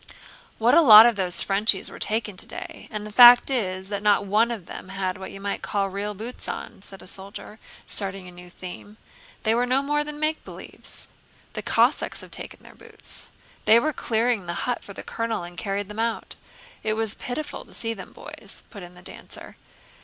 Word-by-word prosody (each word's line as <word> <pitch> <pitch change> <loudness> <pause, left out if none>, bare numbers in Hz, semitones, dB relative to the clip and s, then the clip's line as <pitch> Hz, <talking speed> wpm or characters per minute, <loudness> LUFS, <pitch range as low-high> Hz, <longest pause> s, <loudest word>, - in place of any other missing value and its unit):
"What 230 +2 +3
a 335 - +8
lot 220 -6 +11
of 240 -1 +4
those 185 -3 +1
Frenchies 200 0 +2
were - - -10
taken 215 -2 0
today, - - -6
and 210 -1 -5
the 210 - -8
fact 245 +3 +9
is 190 -6 -2
that 200 -1 -3
not 205 -1 +3
one 215 +4 +3
of 220 -7 -5
them 185 - -9
had 190 -1 -3
what 190 - -7
you 195 - -9
might 200 0 -3
call 195 -1 -1
real 205 +2 -4
boots 230 +5 -6
on," 215 -4 -6
said 195 -1 -13
a - - -13
soldier, 200 +3 -9 0.3
starting 195 -2 0
a - - -10
new 180 0 -13
theme. 185 +4 -10 0.5
"They 220 -1 +3
were 245 +2 +1
no 260 +2 +2
more 295 +1 0
than 295 0 -8
make 310 +1 0
believes." - - -4 0.4
"The - - -4
Cossacks - - +1
have - - -13
taken - - -8
their - - -14
boots. - - -7 0.4
They 225 +2 +7
were 310 +5 0
clearing 225 -5 0
the 170 - -3
hut 245 -1 -2
for 200 - -10
the - - -8
colonel 230 -4 -3
and 175 0 -9
carried 200 +3 -3
them 210 +2 -8
out. 230 0 -2 0.5
It 215 - 0
was 220 -1 0
pitiful 290 +5 -5
to - - -20
see 225 0 -2
them, 200 - -10
boys," - - -7
put 200 - -9
in 175 0 -11
the 180 - -15
dancer. - - -8
210 Hz, 205 wpm, -25 LUFS, 195-235 Hz, 0.5 s, lot